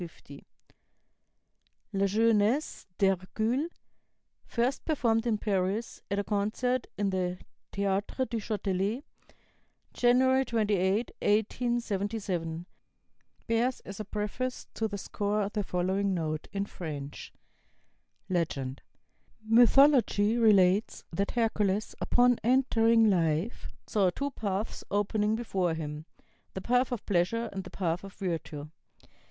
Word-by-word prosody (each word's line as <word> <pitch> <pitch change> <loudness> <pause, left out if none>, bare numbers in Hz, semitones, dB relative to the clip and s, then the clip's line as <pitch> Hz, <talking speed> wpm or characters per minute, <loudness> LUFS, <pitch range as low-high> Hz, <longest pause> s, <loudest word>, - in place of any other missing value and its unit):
50 150 -4 -10 1.5
La 195 0 +2
Jeunesse 225 +6 +2
d'Hercule, 215 - +1 0.8
first 245 +3 0
performed 235 -7 +1
in 220 -2 +2
Paris, 200 +2 -1
at 200 - -1
a 200 - +1
concert 220 +5 -1
in 200 -1 0
the 180 -1 -1 0.3
Théâtre 200 +6 -1
du 230 0 -3
Châtelet, 205 +2 -1 0.9
January 260 +2 +4
28, 210 -2 +1
1877, 205 -6 -1 0.8
bears 235 +3 +1
as 195 +1 -9
a - - -2
preface 210 +5 -3
to 225 - -1
the 205 -1 -5
score 205 +1 -1
the 210 0 -2
following 190 +1 0
note 155 -2 -3
(in 200 0 -2
French): 145 -7 -7 1.0
"LEGEND 140 -7 -2 0.6
"Mythology 235 -2 +5
relates 205 -3 +3
that 195 +4 -1
Hercules, 215 -3 0
upon 245 0 +3
entering 230 -2 +4
life, 170 +2 0 0.2
saw 195 -4 +2
two 280 +10 -3
paths 205 -3 -3
opening 210 +1 +1
before 190 -7 -1
him, 150 -1 -5 0.5
the 190 - -3
path 250 +4 +2
of 240 -4 -4
pleasure 205 +5 0
and 195 -1 -4
the - - -9
path 175 -1 -2
of 195 0 -9
virtue. 165 -6 -4
205 Hz, 110 wpm, -29 LUFS, 185-230 Hz, 1.5 s, Mythology